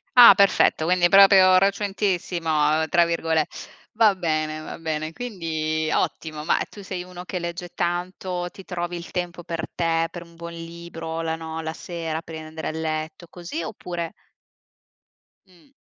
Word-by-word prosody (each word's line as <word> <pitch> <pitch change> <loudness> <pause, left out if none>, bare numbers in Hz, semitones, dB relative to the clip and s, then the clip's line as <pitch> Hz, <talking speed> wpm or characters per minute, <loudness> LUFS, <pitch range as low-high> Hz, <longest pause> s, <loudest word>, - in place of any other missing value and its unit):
Ah, 240 -4 +11
perfetto, 200 -5 +4
quindi 175 0 +4
proprio 190 -1 +7
"recentissimo" 175 -6 +1
tra 170 -2 +5
virgole 165 -2 +1 0.5
va 220 -2 +5
bene, 155 -3 -1
va 155 - -7
bene, 155 0 -3
quindi 160 -8 -2
ottimo. 155 -2 -2
Ma - - +2
tu 205 - -11
sei 185 -1 -5
uno 180 0 -9
che 180 0 -4
legge 170 +1 -5
tanto, 175 +1 -2
ti 195 - -13
trovi 175 -1 -4
il 170 - -9
tempo 175 -1 -4
per 165 -1 -4
te, 165 -1 +1
per 175 -1 -7
un 170 0 -18
buon 170 0 -8
libro, 165 -1 -6
la 160 0 -2
no 160 0 -5
la 160 0 -3
sera, 165 -1 -5
prima 160 -1 -8
di 155 - -9
andare 160 0 -6
a - - -1
letto 160 +1 -4
così, 170 -1 -6
oppure 170 +1 -5 1.4
Mh. 185 +9 -23
170 Hz, 160 wpm, -24 LUFS, 160-180 Hz, 1.4 s, Ah